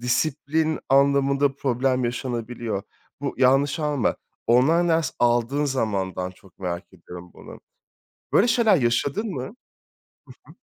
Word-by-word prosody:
disiplin 150 +5 0
anlamında 140 0 +3
problem 130 -1 0
yaşanabiliyor. 120 -3 -3 0.4
Bu 140 -1 -3
yanlış 135 +4 +3
anlama 145 -5 0 0.3
online 155 +9 +4
ders 160 -4 +1
aldığın 120 +4 +2
zamandan 95 -8 -2
çok 95 0 -21
merak 90 0 -5
ediyorum 90 0 -12
bunu. - - -12 0.7
Böyle 225 - +4
şeyler 225 -4 +4
yaşadın 140 - 0
mı? 135 -9 -4 1.1
Hı - - -14
hı. - - -20
130 Hz, 120 wpm, -24 LUFS, 120-145 Hz, 1.1 s, online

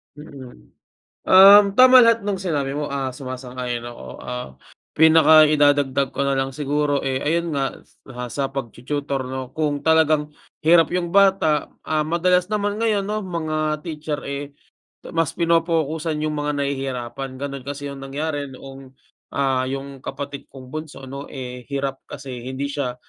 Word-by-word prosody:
Mm. 140 -4 -13 0.5
Um, 195 +2 +9
tama 255 0 +8
lahat 230 0 +4
no'ng 205 -1 -1
sinabi 145 -7 -2
mo, 150 0 -2
ah, 135 -2 -2
sumasang-ayon 125 -2 -5
ako. 120 - -10
Ah, 125 - -6 0.5
pinaka 160 -1 +7
idadagdag 145 -2 +2
ko 140 - -3
na 140 - +1
lang 135 0 -1
siguro, 145 +1 0
eh, 135 -1 -1
ayun 170 +2 0
nga, 135 -1 -2 0.5
sa 140 -1 -2
pagtu-tutor 135 +2 -4
'no, 130 -1 -6
kung 150 -2 -1
talagang 155 -2 +3 0.3
hirap 165 0 +5
yung 175 -1 -1
bata, 190 -7 +3 0.2
ah, 155 -1 +1
madalas 180 +3 +1
naman 205 -1 0
ngayon 210 -3 0
'no, 215 0 -2
mga 155 -3 -2
teacher, 150 -1 -4
eh, 140 +1 -5 0.6
mas 165 -3 -1
pinopokusan 165 -2 0
yung 155 0 -1
mga 145 0 -1
nahihirapan. 135 -1 -4
Ganun 140 -1 -6
kasi 145 0 -5
yung 140 - -8
nangyari 145 +1 -3
noong, 135 0 -12 0.4
ah, 130 -2 +1
yung 135 +1 -5
kapatid 140 0 -6
kong 130 -1 -12
bunso 155 -3 -7
'no, 140 +2 -7
eh, 125 -2 -8
hirap 135 -1 -2
kasi 125 -2 -8
hindi 135 +2 -4
siya 135 -4 -3
145 Hz, 150 wpm, -22 LUFS, 135-160 Hz, 0.6 s, Um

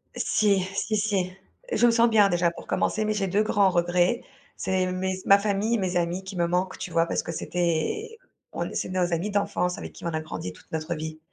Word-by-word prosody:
Si, 200 -3 +2
si, 215 - 0
si. 200 -4 0 0.4
Je 240 - +3
me - - +5
sens 230 +1 +4
bien, 210 -3 +5
déjà 175 -1 +2
pour - - -11
commencer 220 - 0
mais 215 - +1
j'ai 200 -2 0
2 200 +4 +2
grands 205 -2 +3
regrets, 175 +5 +2 0.4
c'est 185 0 0
mes 185 +1 -1
ma 200 0 +7
famille, 210 +3 +1
mes 185 -2 0
amis 175 +2 -1
qui 190 0 -8
me 170 - +2
manquent, 180 +2 -1
tu 175 - -6
vois? 165 0 +2
Parce - - -1
que 170 - -5
c'était 175 - -2 0.3
on - - -3
c'est - - -2
nos 180 -1 0
amis 175 +5 -1
d'enfance, 180 -3 0
avec - - -7
qui - - -11
on - - 0
a 160 - 0
grandi 90 - -6
toute - - -20
notre 160 +2 -2
vie. 155 0 -6
185 Hz, 220 wpm, -26 LUFS, 170-205 Hz, 0.4 s, ma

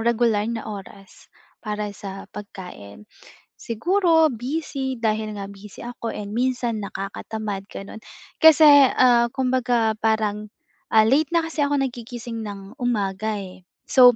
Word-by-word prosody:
regular 225 -2 +2
na 230 -1 -4
oras 195 -1 -10 0.3
para 210 -1 -3
sa 195 -1 -8
pagkain. 180 - -10 0.5
Siguro 325 - +2
busy, 265 0 -3
dahil 215 -2 -1
nga 195 - -5
busy 200 0 -12
ako 235 -1 -5
and 205 0 -6
minsan 240 -3 -1
nakakatamad 200 +1 -5
gano'n. 200 +2 -8 0.4
Kasi, 320 -1 +8 0.2
ah, 240 -2 +4
kumbaga 245 -4 +1
parang, 215 -1 0 0.4
ah, 220 0 +5
late 285 +6 +2
na 335 -1 +1
kasi 320 -2 -1
ako 285 0 +1
nagigising 240 -3 -5
ng 200 +1 -8
umaga, 215 -4 -1
eh. 185 -1 -10 0.2
So, 250 -2 +7
225 Hz, 125 wpm, -23 LUFS, 205-250 Hz, 0.5 s, Kasi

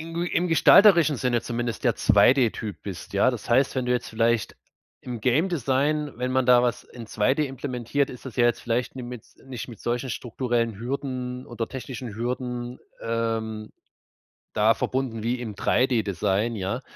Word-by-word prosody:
in 165 +1 -8
gu 170 - -1
im 175 +1 0
gestalterischen 170 -2 +6
Sinne 120 -1 0
zumindest 120 -1 -4
der - - +3
2D-Typ 115 -5 +3
bist. 95 -3 -8
Ja, 100 +6 +3
das 120 -2 -7
heißt, 130 +3 +3
wenn 130 -1 -1
du 125 - +2
jetzt 125 - -1
vielleicht 115 0 0 0.5
im 120 -3 -6
Game 140 - +2
Design, 145 0 0
wenn 125 +1 -2
man 130 -1 +2
da 125 -1 +6
was 120 -3 -1
in 115 -2 -11
2D 130 +9 +1
implementiert, 135 0 -2
ist 125 - -11
das 125 - -9
ja 120 - +4
jetzt 120 - +2
vielleicht 120 +2 -2
ni 130 - -5
mit 120 -2 -8 0.2
nicht 130 -2 -7
mit 115 -4 -11
solchen 120 +2 -2
strukturellen 120 -2 -2
Hürden 125 0 -4
oder 120 -1 -4
technischen 125 -3 -7
Hürden, 125 +1 -4 0.2
ähm, 115 -1 -2 0.8
da 110 +2 +4
verbunden 125 -4 -2
wie 120 +2 -1
im 110 -4 -6
3D-Design, 110 -3 +1
ja. 100 +6 -3
125 Hz, 170 wpm, -25 LUFS, 115-130 Hz, 0.8 s, gestalterischen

